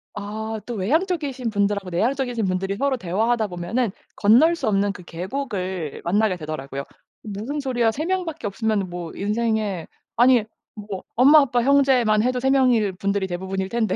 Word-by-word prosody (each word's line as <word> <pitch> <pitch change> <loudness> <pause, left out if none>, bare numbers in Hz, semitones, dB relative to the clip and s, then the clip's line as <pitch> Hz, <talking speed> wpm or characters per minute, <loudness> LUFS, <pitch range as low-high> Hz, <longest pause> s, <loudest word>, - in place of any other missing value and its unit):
아 220 +2 -4
또 240 - -5
외향적이신 280 - -1
분들하고 200 -2 0
내향적이신 240 +4 0
분들이 190 +1 -1
서로 275 0 +1
대화하다 220 +4 0
보면은 190 +6 -2 0.2
건널 255 +12 +5
수 - - -3
없는 200 -1 +2
그 185 -2 -10
계곡을 185 - -4
만나게 200 +2 +2
되더라고요. 140 -3 -5 0.4
"무슨 220 +8 -4
소리야? 245 -4 +1
3 305 +8 -4
명밖에 355 - -2
없으면은 205 -2 -1
뭐 175 -2 -6
인생에 210 -3 -1 0.3
아니 245 -1 +5 0.3
뭐 205 -3 -7
엄마, 280 +6 +7
아빠, 245 -3 +1
형제만 255 -5 +4
해도 250 +1 0
3 265 +1 +1
명일 245 -7 +3
분들이 200 +1 -1
대부분일 190 +2 -3
텐데 220 -4 0
215 Hz, 360 characters per minute, -23 LUFS, 190-255 Hz, 0.4 s, 엄마